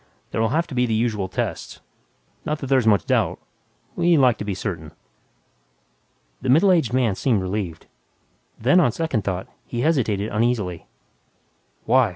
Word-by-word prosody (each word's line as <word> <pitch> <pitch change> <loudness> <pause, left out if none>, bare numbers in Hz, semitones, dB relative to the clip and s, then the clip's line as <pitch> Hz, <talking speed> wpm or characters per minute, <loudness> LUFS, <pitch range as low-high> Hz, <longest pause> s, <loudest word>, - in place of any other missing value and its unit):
There'll 110 0 0
have 165 +3 +1
to 150 - -10
be 125 -1 +1
the 110 - 0
usual 110 -4 0
tests. 95 - -4 0.6
Not 150 - -2
that 145 - -6
there's 130 -4 +3
much 100 -5 +4
doubt... - - +1 0.6
we 170 -1 +3
like 125 -5 +4
to - - -3
be 100 -2 -3
certain." 85 -6 -5 1.5
The 130 - -3
middle 165 +9 +5
aged 160 -11 +2
man 125 -4 +2
seemed 110 +2 +1
relieved. 95 -4 -4 0.7
Then, 135 +10 +4
on 150 -9 +3
second 135 -6 -2
thought, 95 -1 -3 0.2
he 120 - -4
hesitated 110 -9 0
uneasily, 105 -6 -1 1.0
"Why? 125 0 +4
115 Hz, 155 wpm, -22 LUFS, 100-130 Hz, 1.5 s, middle